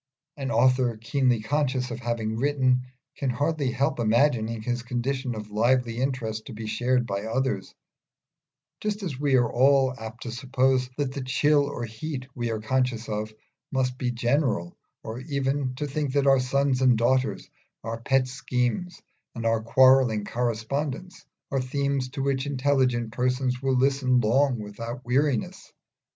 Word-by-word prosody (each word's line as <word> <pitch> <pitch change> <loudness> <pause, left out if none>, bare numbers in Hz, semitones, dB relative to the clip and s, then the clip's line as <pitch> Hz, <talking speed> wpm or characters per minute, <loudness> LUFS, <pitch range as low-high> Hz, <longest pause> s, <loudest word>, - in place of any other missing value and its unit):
An 135 -3 -4
author, 125 -3 +3
keenly 125 0 +1
conscious 130 -1 0
of 115 - -5
having 115 -2 -2
written, 130 -1 +1 0.3
can 135 - -1
hardly 145 +2 0
help 135 +4 0
imagining 115 -1 +2
his 120 +1 -2
condition 125 +1 -2
of 105 -1 -7
lively 120 +2 +1
interest 120 -5 -2
to 130 - -7
be 110 +1 -7
shared 120 +3 +1
by 100 -1 -3
others, 115 -3 -2 1.0
just 210 -1 -3
as 145 -9 -4
we 140 -2 +2
are 120 -2 +4
all 135 +1 +4
apt 110 +1 -8
to 120 - -5
suppose 130 +1 +1
that 140 -3 -1
the 140 - -5
chill 145 +3 +3
or 125 -4 -4
heat 130 +4 -6
we 120 -1 -3
are 110 -1 -2
conscious 125 0 -1
of 105 0 -3 0.4
must 130 -2 0
be 125 - 0
general, 120 - 0 0.3
or 110 +2 -6
even 135 -1 -1
to 145 +3 -3
think 145 -1 -2
that 140 -1 +2
our 135 -1 +5
sons 135 0 +1
and 125 -3 +5
daughters, 130 +3 +1 0.4
our 115 +1 -5
pet 130 +1 +2
schemes, 130 +5 -2 0.3
and 115 -1 -5
our 115 -1 +2
quarrelling 125 -2 +4
correspondence, 130 - -3 0.3
are 135 -1 +1
themes 140 0 -1
to 135 +1 -4
which 135 0 0
intelligent 130 -4 +1
persons 125 +1 0
will 135 -1 +1
listen 130 -1 +3
long 125 +3 +2
without 115 +4 -7
weariness. 130 -1 0
130 Hz, 155 wpm, -26 LUFS, 115-135 Hz, 1.0 s, our